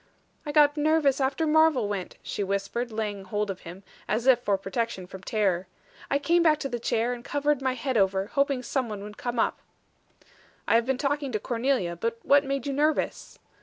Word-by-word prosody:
"I -, -, -1 dB
got 295 Hz, 0 st, +5 dB
nervous 300 Hz, -2 st, +2 dB
after 270 Hz, +4 st, +1 dB
Marvel 310 Hz, -7 st, +4 dB
went," 200 Hz, -3 st, -4 dB
she 205 Hz, -, -3 dB
whispered, 200 Hz, +5 st, -2 dB
laying 210 Hz, -3 st, -3 dB
hold 205 Hz, +1 st, -2 dB
of 185 Hz, -, -8 dB
him, 180 Hz, +4 st, -10 dB, 0.2 s
as 220 Hz, +4 st, -1 dB
if 260 Hz, -2 st, +6 dB
for 205 Hz, -5 st, +1 dB
protection 195 Hz, 0 st, -3 dB
from 190 Hz, +1 st, -10 dB
terror. 190 Hz, -3 st, 0 dB, 0.4 s
"I 280 Hz, -, +3 dB
came 340 Hz, +4 st, +2 dB
back 315 Hz, -2 st, +4 dB
to 275 Hz, -, -1 dB
the 240 Hz, -, -3 dB
chair 230 Hz, +1 st, 0 dB
and 240 Hz, -1 st, -8 dB
covered 290 Hz, 0 st, 0 dB
my 260 Hz, -1 st, +1 dB
head 255 Hz, 0 st, -2 dB
over, 195 Hz, -1 st, +2 dB
hoping 275 Hz, +2 st, 0 dB
some 255 Hz, -1 st, -1 dB
one 205 Hz, -2 st, -6 dB
would 210 Hz, 0 st, -9 dB
come 240 Hz, -1 st, -3 dB
up." -, -, +1 dB, 1.1 s
"I -, -, +3 dB
have 230 Hz, +1 st, +3 dB
been 265 Hz, -1 st, +1 dB
talking 280 Hz, 0 st, -1 dB
to 215 Hz, -, 0 dB
Cornelia. 235 Hz, -7 st, -1 dB
But 230 Hz, +7 st, -2 dB
what 285 Hz, 0 st, +5 dB
made 275 Hz, -2 st, -2 dB
you 280 Hz, -, -2 dB
nervous?" 300 Hz, +3 st, -1 dB
240 Hz, 205 wpm, -27 LUFS, 205-280 Hz, 1.1 s, if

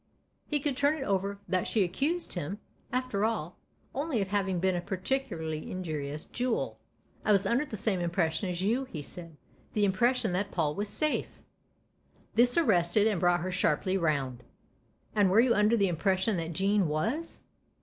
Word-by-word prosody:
He 295 Hz, -, 0 dB
could 280 Hz, -1 st, -1 dB
turn 285 Hz, +3 st, +2 dB
it 275 Hz, -, -4 dB
over 200 Hz, +1 st, 0 dB
that 185 Hz, 0 st, 0 dB
she 215 Hz, -, +2 dB
accused 285 Hz, -, -1 dB
him, 175 Hz, +2 st, -4 dB, 0.3 s
after 255 Hz, -5 st, -1 dB
all, 215 Hz, -7 st, -2 dB, 0.3 s
only 280 Hz, -2 st, -1 dB
of 195 Hz, -2 st, -1 dB
having 195 Hz, -3 st, 0 dB
been 190 Hz, +1 st, +2 dB
a 175 Hz, -, -1 dB
particularly 185 Hz, -, -3 dB
injurious 155 Hz, -5 st, -4 dB
jool. 250 Hz, -1 st, -2 dB, 0.2 s
" -, -, -34 dB
I 215 Hz, -, +2 dB
was 200 Hz, -1 st, +4 dB
under 240 Hz, +8 st, +2 dB
the 220 Hz, -, -6 dB
same 200 Hz, -2 st, 0 dB
impression 170 Hz, 0 st, 0 dB
as 180 Hz, +1 st, -2 dB
you," 240 Hz, +7 st, +1 dB
he 160 Hz, -, -7 dB
said 165 Hz, +2 st, -9 dB, 0.2 s
" -, -, -32 dB
the 210 Hz, -1 st, +3 dB
impression 235 Hz, +3 st, +2 dB
that 190 Hz, +3 st, -1 dB
Paul 155 Hz, -4 st, 0 dB
was 205 Hz, +5 st, -3 dB
safe." 305 Hz, +7 st, -1 dB, 0.9 s
This 245 Hz, +4 st, +5 dB
arrested 205 Hz, -, +3 dB
and 210 Hz, -5 st, +2 dB
brought 175 Hz, 0 st, +3 dB
her 185 Hz, +1 st, -3 dB
sharply 180 Hz, +1 st, +1 dB
round, 140 Hz, -8 st, 0 dB, 0.7 s
"And 205 Hz, -3 st, +4 dB
were 195 Hz, +4 st, +5 dB
you 240 Hz, 0 st, +5 dB
under 210 Hz, +2 st, +3 dB
the 200 Hz, -2 st, +3 dB
impression 190 Hz, +4 st, +1 dB
that 165 Hz, 0 st, -3 dB
Jean 195 Hz, +2 st, +2 dB
was 225 Hz, -, -2 dB
195 Hz, 180 wpm, -30 LUFS, 175-230 Hz, 0.9 s, This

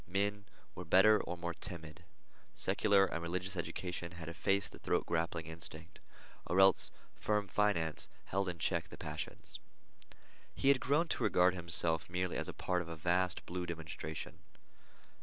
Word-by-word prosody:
Men 100 Hz, +2 st, -1 dB, 0.3 s
were 90 Hz, -, -6 dB
better, 95 Hz, +5 st, +6 dB
or 90 Hz, -, -5 dB
more 85 Hz, 0 st, -3 dB
timid. 85 Hz, -2 st, -8 dB, 0.5 s
Secular 100 Hz, -2 st, +4 dB
and 85 Hz, -, -3 dB
religious 90 Hz, +3 st, -3 dB
education 85 Hz, +1 st, -4 dB
had 85 Hz, -2 st, -7 dB
effaced 100 Hz, +4 st, 0 dB
the -, -, -12 dB
throat -, -, 0 dB
grappling 85 Hz, -1 st, -1 dB
instinct, 80 Hz, 0 st, -6 dB, 0.5 s
or 90 Hz, -, +2 dB
else 95 Hz, 0 st, +6 dB, 0.2 s
firm 105 Hz, -1 st, 0 dB
finance 90 Hz, -6 st, +1 dB, 0.2 s
held 95 Hz, 0 st, -1 dB
in 85 Hz, -, -5 dB
check -, -, 0 dB
the -, -, -11 dB
passions. -, -, -4 dB, 1.0 s
He 135 Hz, -, +2 dB
had 140 Hz, -2 st, +6 dB
grown 150 Hz, +7 st, +2 dB
to -, -, -1 dB
regard 90 Hz, +1 st, +4 dB
himself 85 Hz, -2 st, +1 dB
merely 90 Hz, +1 st, -1 dB
as -, -, -2 dB
a -, -, -3 dB
part 90 Hz, -1 st, -1 dB
of 85 Hz, -, -7 dB
a 85 Hz, -, -5 dB
vast 90 Hz, +3 st, 0 dB
blue 90 Hz, 0 st, -4 dB
demonstration. 80 Hz, -2 st, -6 dB
90 Hz, 160 wpm, -35 LUFS, 85-95 Hz, 1.0 s, better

